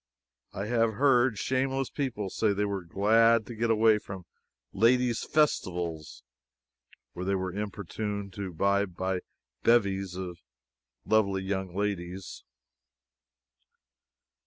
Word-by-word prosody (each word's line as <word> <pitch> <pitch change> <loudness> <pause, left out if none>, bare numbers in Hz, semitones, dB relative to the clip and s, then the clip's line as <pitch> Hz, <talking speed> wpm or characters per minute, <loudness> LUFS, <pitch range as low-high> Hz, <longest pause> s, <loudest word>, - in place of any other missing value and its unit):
I 100 - -4
have 115 0 +1
heard 125 -3 +3
shameless 135 +2 -1
people 115 -9 -3
say 110 -2 +1
they 105 +1 0
were 100 -1 -2
glad 110 +5 +3
to 120 - -8
get 115 +1 -1
away 110 -1 +4
from 95 -4 -9 0.5
Ladies' 120 +2 +3
Festivals 85 - -1 0.9
where 90 - -5
they 100 +1 0
were 95 -1 -3
importuned 100 0 -4
to 95 -1 -5
buy 100 +4 +2
by 95 0 -3 0.4
bevies 100 -5 +2
of 90 -2 -6 0.7
lovely 100 -3 +2
young 95 -2 -3
ladies. 95 -2 -4
100 Hz, 110 wpm, -28 LUFS, 95-115 Hz, 0.9 s, away